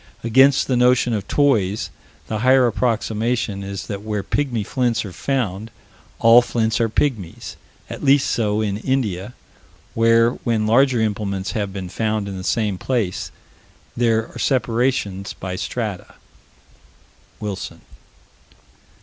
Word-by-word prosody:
Against 130 Hz, +4 st, +5 dB
the 130 Hz, -, 0 dB
notion 125 Hz, 0 st, +3 dB
of 100 Hz, -3 st, -3 dB
toys, 110 Hz, -9 st, +1 dB, 0.3 s
the 110 Hz, -, -3 dB
higher 130 Hz, +2 st, +5 dB
approximation 115 Hz, -2 st, -1 dB
is 100 Hz, -1 st, -6 dB
that 100 Hz, -2 st, -5 dB
where 105 Hz, -2 st, -3 dB
"pygmy 120 Hz, -1 st, -1 dB
flints" 120 Hz, -2 st, 0 dB
are 95 Hz, -, -8 dB
found, 110 Hz, -6 st, -2 dB, 0.5 s
all 115 Hz, +1 st, +7 dB
flints 115 Hz, -1 st, 0 dB
are 115 Hz, -, +2 dB
pygmies 110 Hz, -, -2 dB, 0.3 s
at -, -, -8 dB
least 140 Hz, 0 st, +4 dB
so 105 Hz, -2 st, 0 dB
in 100 Hz, -2 st, -1 dB
India, 110 Hz, -4 st, -2 dB, 0.6 s
where, 115 Hz, +1 st, +4 dB
when 115 Hz, -4 st, 0 dB
larger 125 Hz, +3 st, +4 dB
implements 100 Hz, -3 st, -2 dB
have 100 Hz, 0 st, -2 dB
been 95 Hz, -1 st, -6 dB
found 110 Hz, +2 st, -2 dB
in 100 Hz, -, -5 dB
the 95 Hz, -, -6 dB
same 105 Hz, -3 st, -1 dB
place, 115 Hz, -8 st, -2 dB, 0.7 s
there 115 Hz, -2 st, +1 dB
are -, -, -8 dB
separations 115 Hz, -5 st, 0 dB
by 95 Hz, 0 st, -6 dB
strata. 105 Hz, -1 st, -4 dB, 1.2 s
(Wilson.) 105 Hz, -3 st, -6 dB
110 Hz, 130 wpm, -21 LUFS, 100-125 Hz, 1.2 s, all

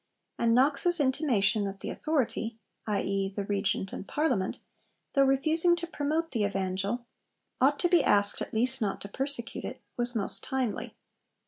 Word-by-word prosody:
And 230 Hz, 0 st, +3 dB
Knox's 295 Hz, +7 st, +4 dB
intimation 260 Hz, -7 st, +2 dB
that 195 Hz, 0 st, -6 dB
the -, -, -4 dB
Authority 235 Hz, -7 st, -1 dB, 0.3 s
i.e., 195 Hz, -2 st, 0 dB
the 200 Hz, 0 st, -4 dB
Regent 195 Hz, -1 st, -1 dB
and 195 Hz, -, -6 dB
Parliament 255 Hz, -11 st, 0 dB, 0.6 s
though 275 Hz, -2 st, +5 dB
refusing 315 Hz, +6 st, +3 dB
to 340 Hz, 0 st, -4 dB
promote 325 Hz, 0 st, -2 dB
the 225 Hz, -5 st, 0 dB
Evangel, 195 Hz, +4 st, -1 dB, 0.6 s
ought 280 Hz, +2 st, +4 dB
to 350 Hz, -, +4 dB
be 345 Hz, -3 st, +4 dB
asked 205 Hz, 0 st, +3 dB
at -, -, -4 dB
least 255 Hz, +4 st, +1 dB
not 200 Hz, -3 st, -1 dB
to -, -, -6 dB
persecute 265 Hz, +1 st, -3 dB
it, -, -, -6 dB, 0.2 s
was 240 Hz, 0 st, -1 dB
most 205 Hz, -3 st, -2 dB
timely. 260 Hz, -5 st, -2 dB
240 Hz, 155 wpm, -29 LUFS, 200-285 Hz, 0.6 s, though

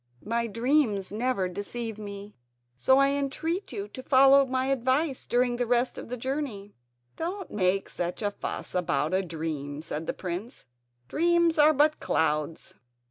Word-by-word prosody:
My 235 Hz, +2 st, 0 dB
dreams 230 Hz, -4 st, +1 dB
never 220 Hz, -3 st, 0 dB
deceive 215 Hz, +4 st, -5 dB
me, 205 Hz, 0 st, -8 dB, 0.4 s
so 265 Hz, -, +4 dB
I 275 Hz, 0 st, +5 dB
entreat 285 Hz, +7 st, -2 dB
you 200 Hz, 0 st, -4 dB
to 260 Hz, -, -8 dB
follow 270 Hz, +1 st, +6 dB
my 260 Hz, 0 st, 0 dB
advice 270 Hz, +2 st, 0 dB
during 245 Hz, 0 st, +2 dB
the 245 Hz, -1 st, -1 dB
rest 245 Hz, +1 st, +1 dB
of -, -, -8 dB
the 250 Hz, -, -3 dB
journey." 245 Hz, -6 st, -4 dB, 0.4 s
"Don't 370 Hz, +4 st, -4 dB
make 195 Hz, -1 st, +1 dB
such 175 Hz, +4 st, -4 dB
a 205 Hz, -, +1 dB
fuss -, -, -5 dB
about 160 Hz, -3 st, 0 dB
a 190 Hz, -, +3 dB
dream," 155 Hz, -5 st, -4 dB
said 160 Hz, -1 st, -5 dB
the -, -, -1 dB
prince; 185 Hz, +7 st, -6 dB, 0.4 s
"dreams 340 Hz, -, +2 dB
are 300 Hz, +1 st, +7 dB
but 300 Hz, +1 st, +3 dB
clouds. 155 Hz, 0 st, -1 dB
235 Hz, 155 wpm, -27 LUFS, 195-275 Hz, 0.4 s, are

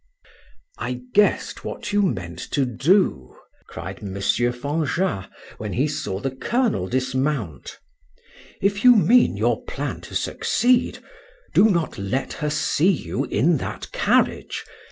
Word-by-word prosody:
"I 125 Hz, 0 st, -4 dB
guessed 210 Hz, 0 st, +2 dB
what 210 Hz, -, -5 dB
you 205 Hz, -, +4 dB
meant 90 Hz, -, -2 dB
to 140 Hz, -3 st, +2 dB
do," 130 Hz, -, +1 dB, 0.3 s
cried -, -, -7 dB
M. 100 Hz, -2 st, -6 dB
Fanjat, 130 Hz, -, 0 dB, 0.3 s
when 105 Hz, -3 st, -4 dB
he 135 Hz, +5 st, +1 dB
saw 145 Hz, -10 st, -3 dB
the 135 Hz, +5 st, -2 dB
colonel 215 Hz, -, 0 dB
dismount. 130 Hz, -, -2 dB, 0.9 s
"If 200 Hz, +1 st, +1 dB
you 250 Hz, -1 st, +8 dB
mean 235 Hz, +4 st, +4 dB
your -, -, +1 dB
plan -, -, -4 dB
to -, -, -10 dB
succeed, 250 Hz, 0 st, +1 dB, 0.6 s
do 220 Hz, -, +6 dB
not 170 Hz, -, -1 dB
let 110 Hz, +8 st, -2 dB
her 150 Hz, -, 0 dB
see 155 Hz, +3 st, +2 dB
you 190 Hz, -, -1 dB
in 165 Hz, +2 st, +2 dB
that -, -, -6 dB
carriage. -, -, +1 dB
140 Hz, 130 wpm, -23 LUFS, 115-195 Hz, 0.9 s, you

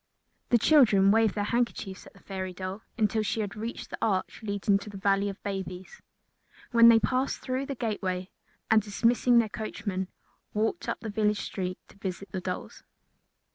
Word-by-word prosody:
The 240 Hz, -, +6 dB
children 215 Hz, -8 st, +5 dB
waved 220 Hz, -1 st, +3 dB
their 205 Hz, -, 0 dB
handkerchiefs 215 Hz, -4 st, -2 dB
at -, -, -16 dB
the -, -, -19 dB
fairy 190 Hz, -1 st, -5 dB
doll 185 Hz, +3 st, -5 dB, 0.2 s
until 220 Hz, -1 st, +2 dB
she 215 Hz, +1 st, -1 dB
had 205 Hz, -1 st, -4 dB
reached 225 Hz, +3 st, -6 dB
the -, -, -6 dB
arch 195 Hz, -4 st, -1 dB
leading 200 Hz, -1 st, +1 dB
to 200 Hz, -, -9 dB
the 200 Hz, -, -8 dB
Valley 195 Hz, +1 st, +2 dB
of 195 Hz, -, -7 dB
Babies, 190 Hz, -, -5 dB, 0.7 s
when 235 Hz, -1 st, +8 dB
they 230 Hz, -, +8 dB
passed 255 Hz, +4 st, 0 dB
through 260 Hz, +1 st, -3 dB
the 275 Hz, -, -3 dB
gateway 190 Hz, -6 st, -2 dB, 0.4 s
and, 220 Hz, 0 st, +6 dB
dismissing 230 Hz, +4 st, +3 dB
their 230 Hz, -2 st, +4 dB
coachmen, 200 Hz, -3 st, -4 dB, 0.5 s
walked 225 Hz, +11 st, 0 dB
up -, -, -3 dB
the 225 Hz, -, -5 dB
village 210 Hz, 0 st, +1 dB
street 185 Hz, -2 st, -4 dB
to -, -, -18 dB
visit 195 Hz, 0 st, -5 dB
the 190 Hz, -, -3 dB
dolls. 180 Hz, 0 st, -5 dB
205 Hz, 175 wpm, -28 LUFS, 195-225 Hz, 0.7 s, when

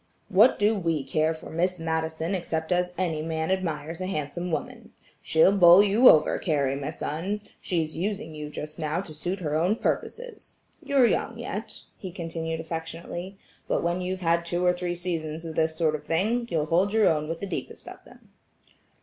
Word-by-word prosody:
"What 215 Hz, +7 st, +5 dB
do 210 Hz, +2 st, +3 dB
we 165 Hz, -7 st, -1 dB
care 155 Hz, +4 st, +1 dB
for 160 Hz, -, -8 dB
Miss 180 Hz, +3 st, 0 dB
Madison 160 Hz, +1 st, -2 dB
except 160 Hz, -3 st, -2 dB
as 180 Hz, 0 st, +1 dB
any 165 Hz, -4 st, -1 dB
man 160 Hz, +2 st, -2 dB
admires 165 Hz, -3 st, -2 dB
a 185 Hz, -, -2 dB
handsome 175 Hz, +1 st, -3 dB
woman. -, -, -5 dB, 0.3 s
She'll 160 Hz, +5 st, +4 dB
bowl 180 Hz, 0 st, +8 dB
you 210 Hz, +5 st, +6 dB
over, 155 Hz, -, +4 dB
Carrie, 140 Hz, -5 st, 0 dB
my 140 Hz, +1 st, -4 dB
son; 170 Hz, +7 st, -3 dB, 0.2 s
she's 160 Hz, -3 st, -1 dB
using 200 Hz, 0 st, -3 dB
you 150 Hz, -1 st, -6 dB
just 150 Hz, +1 st, -7 dB
now 155 Hz, +2 st, -1 dB
to 165 Hz, -5 st, -10 dB
suit 180 Hz, +5 st, -4 dB
her 150 Hz, -3 st, -2 dB
own 175 Hz, +7 st, +2 dB
purposes. 480 Hz, -, -4 dB, 0.3 s
You're 280 Hz, -3 st, +4 dB
young 230 Hz, 0 st, 0 dB
yet," 220 Hz, -2 st, -6 dB, 0.2 s
he 185 Hz, -, -6 dB
continued 165 Hz, -1 st, -4 dB
affectionately, 165 Hz, +3 st, -6 dB, 0.3 s
"but -, -, 0 dB
when 170 Hz, +2 st, 0 dB
you've 185 Hz, +1 st, -3 dB
had 170 Hz, 0 st, +2 dB
two 175 Hz, +1 st, -1 dB
or 180 Hz, -, +5 dB
three 175 Hz, 0 st, -3 dB
seasons 165 Hz, -2 st, -4 dB
of 160 Hz, -, -5 dB
this 160 Hz, 0 st, +1 dB
sort 160 Hz, -1 st, +1 dB
of 150 Hz, -1 st, -4 dB
thing, 215 Hz, +10 st, 0 dB
you'll 160 Hz, -5 st, 0 dB
hold 180 Hz, +6 st, +2 dB
your 220 Hz, -1 st, +4 dB
own 155 Hz, -1 st, +1 dB
with 165 Hz, 0 st, -3 dB
the -, -, -4 dB
deepest 185 Hz, -, -6 dB
of -, -, -10 dB
them." -, -, -19 dB
170 Hz, 190 wpm, -26 LUFS, 160-190 Hz, 0.3 s, bowl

